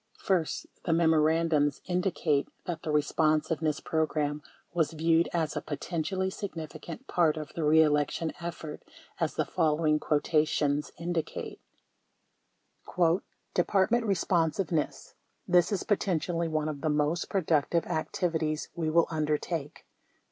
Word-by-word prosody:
First, 180 -5 0 0.2
the 165 - +1
memorandums 160 -2 +3
indicate 175 -5 0 0.2
that 170 -2 -4
the - - -5
Eespon 155 +1 +2
siveness 155 -2 -1
Program 150 -2 0 0.3
was 165 -2 +1
viewed 165 +1 +2
as 160 -3 -1
a - - -1
potentially 180 +5 -2
significant 185 - -7
part 165 - +2
of 155 -1 -6
the 165 - -3
reelection 150 +1 +3
effort 165 -3 -6 0.4
as - - -1
the - - 0
following 155 -2 +2
quotations 150 -1 +1
indicate: 170 -1 -4 1.9
"Department 200 +6 +2
Eesponsiveness: 170 -3 0 0.3
This 175 +1 +4
is 200 - -1
potentially 170 -4 0
one 155 -1 -1
of 145 -2 -4
the 155 - 0
most 150 +3 0
productive 170 -3 +1
activi 160 +1 -1
ties 155 0 -3
we 160 -2 -1
will 170 +2 +4
undertake." 155 0 -2
160 Hz, 120 wpm, -29 LUFS, 150-170 Hz, 1.9 s, This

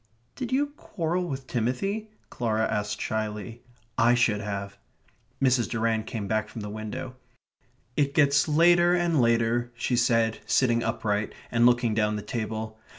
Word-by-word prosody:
"Did 255 -2 -5
you 285 +2 +1
quarrel 180 - -2
with 135 -3 -5
Timothy?" 165 - -2 0.2
Clara 110 -2 0
asked 105 -1 -2
shyly. 110 +2 -4 0.4
"I 120 +1 +5
should 110 -4 +2
have." 100 -1 -5 0.6
Mrs. 130 -3 +2
Durrant 110 -1 0
came 105 -4 -4
back 110 +1 -1
from 115 - -7
the 105 0 -6
window. 110 +4 -6 0.8
"It 140 -1 +1
gets 140 -1 +4
later 175 +3 +5
and 170 -5 +2
later," 115 +1 +2
she 120 +1 -1
said, 115 -2 +2
sitting 120 -3 +3
upright, 105 -2 -1 0.2
and 120 0 +5
looking 120 -2 +3
down 105 -1 +1
the 105 - -4
table. 110 -1 -4
115 Hz, 150 wpm, -27 LUFS, 110-140 Hz, 0.8 s, I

